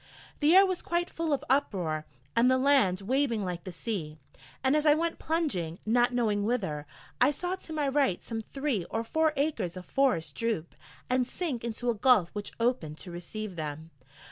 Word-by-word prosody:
The 310 +4 +5
air 390 +1 +9
was 370 -2 -2
quite 345 0 -1
full 330 -1 -2
of 285 - 0
uproar, 180 - 0 0.3
and 235 +2 +5
the 260 - +4
land 260 -9 +3
waving 235 -1 0
like 175 -1 -4
the 185 - -5
sea: 170 -6 -4 0.5
and 265 +2 +3
as 305 - +2
I 300 -1 +6
went 335 +1 -1
plunging, 275 - -1
not 240 +3 +3
knowing 220 -4 +1
whither, 190 -11 -1 0.3
I - - +7
saw 355 +5 -2
to 335 - -11
my 300 -2 0
right 270 -9 +1
some 225 -1 -4
three 270 -4 -2
or 225 - -1
four 315 +6 +2
acres 275 - -1
of 180 - -8
forest 210 - +1
droop 220 -7 -2 0.3
and 255 -1 +1
sink 285 -10 -3
into 235 +1 -1
a - - -1
gulf 215 -5 +4
which 205 -1 -4
opened 230 -11 0
to 180 - -7
receive 185 +3 -6
them. 155 0 -5
235 Hz, 190 wpm, -29 LUFS, 180-285 Hz, 0.5 s, air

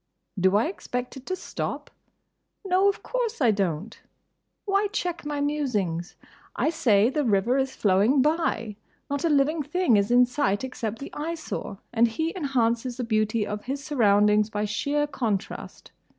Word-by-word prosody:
Do 190 +2 +3
I 215 - +3
expect 250 -8 -4
it 265 -1 -11
to 370 - -1
stop? - - -5 0.7
No, 385 +1 +4
of 400 - -4
course 485 -3 -2
I 245 -6 +4
don't. 195 0 -2 0.7
Why 400 0 +2
check 355 -6 -3
my 295 -1 -2
musings? 215 - -1 0.4
I 315 - +1
say, 230 -8 +3
the 300 +1 0
river 230 +3 +2
is 265 0 -1
flowing 205 +7 +3
by. 295 -9 0 0.3
Not 285 0 -1
a - - +3
living 300 +2 +2
thing 295 - +2
is 200 0 +1
in 245 +1 +6
sight 240 -5 0
except 230 -4 -4
the 275 - -9
Eyesore; 315 -9 -5 0.2
and 235 0 +4
he 320 - -2
enhances 250 -6 0
the 250 - -2
beauty 215 -1 +1
of 210 0 -5
his 275 +2 -4
surroundings 210 -6 +3
by 210 -1 -2
sheer 285 +8 0
contrast. 230 -9 -4
250 Hz, 160 wpm, -26 LUFS, 210-295 Hz, 0.7 s, in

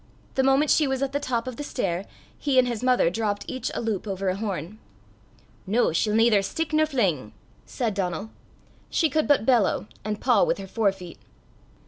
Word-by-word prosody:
The 265 - +2
moment 270 +3 +3
she 305 - +4
was 265 0 -1
at 275 - -1
the 285 - -1
top 240 -4 -2
of 255 - -5
the 290 - -4
stair, 195 -9 -2 0.3
he 280 -3 0
and 255 -1 +5
his 235 -3 -3
mother 250 -9 +3
dropped 205 0 -2
each 260 - -3
a - - -2
loop 215 -2 -2
over 195 -1 -2
a 185 - 0
horn. 195 -1 -4 0.9
"Noo, 215 -3 +2
she'll 210 +5 +1
naither 225 -2 +5
stick 310 +11 -3
nor 310 0 +3
fling 220 - +1
(gore - - -10
nor - - -11
kick)," - - -19 0.3
said 230 -4 -2
Donal: 195 +2 -3 0.6
she 320 -4 +1
could 310 +1 +1
but 285 -7 +3
bellow, 230 -6 +2 0.2
and 210 -1 -3
paw 245 -3 +3
with - - +1
her 195 - -7
fore 205 +1 +1
feet. 180 -3 -11
225 Hz, 210 wpm, -25 LUFS, 195-265 Hz, 0.9 s, and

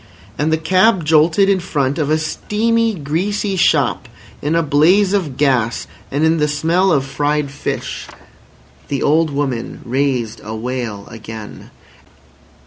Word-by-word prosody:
And 150 +2 0
the 160 - +3
cab 185 +2 +3
jolted 160 +5 +4
in 195 -1 +3
front 145 -5 -1
of 150 -2 0
a 155 - +3
steamy, 225 +8 0
greasy 190 +7 -2
shop 140 -7 +2 0.3
in 150 +3 0
a 165 - +2
blaze 170 +7 +3
of 160 -10 -1
gas 125 -5 +1 0.2
and 145 +3 -1
in 160 +1 +3
the 150 -1 +2
smell 165 +6 +1
of 140 -4 +2
fried 145 +1 -1
fish. 145 - -4 0.8
The 140 - -2
old 160 +2 +3
woman 140 -5 -3
raised 130 -3 -1
a 110 +1 -6
wail 115 -3 -4
again. 110 -1 -9
150 Hz, 140 wpm, -18 LUFS, 135-175 Hz, 0.8 s, jolted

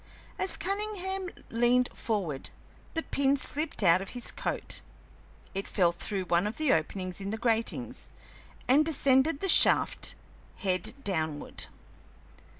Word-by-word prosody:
As 380 - 0
Cunningham 385 -1 -3 0.2
leaned 240 +2 +3
forward 185 - -3 0.5
the 325 - -1
pin 280 0 +1
slipped 295 -3 +1
out 175 0 +5
of 195 - -7
his 245 - -1
coat; - - -2 0.7
it 195 - -4
fell 180 -4 +2
through 190 +2 -3
one 175 +3 +1
of 215 - -5
the 310 -3 +3
openings 185 +4 -2
in 195 - -4
the 220 - -3
grating, 230 -1 -1 0.7
and 275 +5 +5
descended 280 -1 +2
the 390 - 0
shaft - - +6 0.4
head 185 +2 -1
downward. 160 -6 -2
230 Hz, 130 wpm, -29 LUFS, 185-305 Hz, 0.7 s, shaft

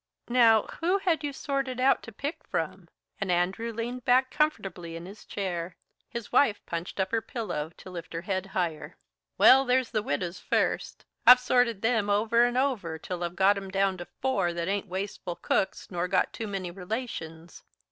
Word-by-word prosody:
"Now, 230 -3 +5 0.2
who 355 +4 +2
had 345 -5 0
you 290 - -1
sorted 275 -2 -3
out 265 +2 +4
to 225 - -10
pick 285 - -5
from?" 165 +2 -4 0.3
and 195 -2 -1
Andrew 190 +7 0
leaned 235 +2 -4
back 255 +2 +3
comfortably 190 - -1
in 165 +1 -7
his 200 +3 -12
chair. 180 -3 -4 0.3
His 235 -2 -6
wife 240 -5 +4
punched 170 +3 -5
up 190 0 0
her 225 -1 +1
pillow 210 - -4
to - - -11
lift 170 -2 -8
her 165 - -3
head 190 +1 -2
higher. 170 -5 -3 0.4
"Well, 270 +1 +8
there's 255 -1 +1
the 215 - +1
widows 175 +1 -3
first. - - -1 0.2
I've 250 0 +11
sorted 245 -4 +2
them 225 -3 +2
over 225 +3 +4
and 245 +1 0
over 235 -12 0
till 175 +2 -5
I've 175 0 -3
got 195 +2 +4
'em 195 -1 -6
down 195 0 +1
to 175 - -7 0.2
four 260 -10 +1
that 170 0 -3
ain't 200 +1 -1
wasteful 190 -1 -4
cooks 190 +3 -1
nor 175 0 -1
got 185 +1 +1
too 225 - -5
many 190 -3 -4
relations. 175 -4 -6
200 Hz, 185 wpm, -28 LUFS, 175-245 Hz, 0.4 s, I've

